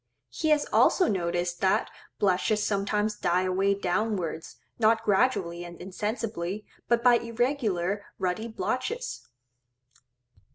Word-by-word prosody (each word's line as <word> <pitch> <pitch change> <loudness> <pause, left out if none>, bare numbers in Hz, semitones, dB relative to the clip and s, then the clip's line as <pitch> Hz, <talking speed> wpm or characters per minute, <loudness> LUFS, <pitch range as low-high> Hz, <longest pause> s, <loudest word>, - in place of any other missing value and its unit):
He 315 - -1
has 300 -1 +3
also 365 - +5
noticed 175 -2 -1
that 190 - +2 0.3
blushes 205 +2 +1
sometimes 210 +1 0
die 180 +1 +2
away 190 +2 +2
downwards, 185 -4 -2 0.2
not 225 0 +3
gradually 190 -5 +1
and 175 -1 -10
insensibly, 210 0 -4 0.2
but 235 0 +2
by 245 -1 +6
irregular 225 -6 -1
ruddy 190 +4 -2
blotches. 415 - -3
205 Hz, 110 wpm, -27 LUFS, 180-230 Hz, 0.3 s, by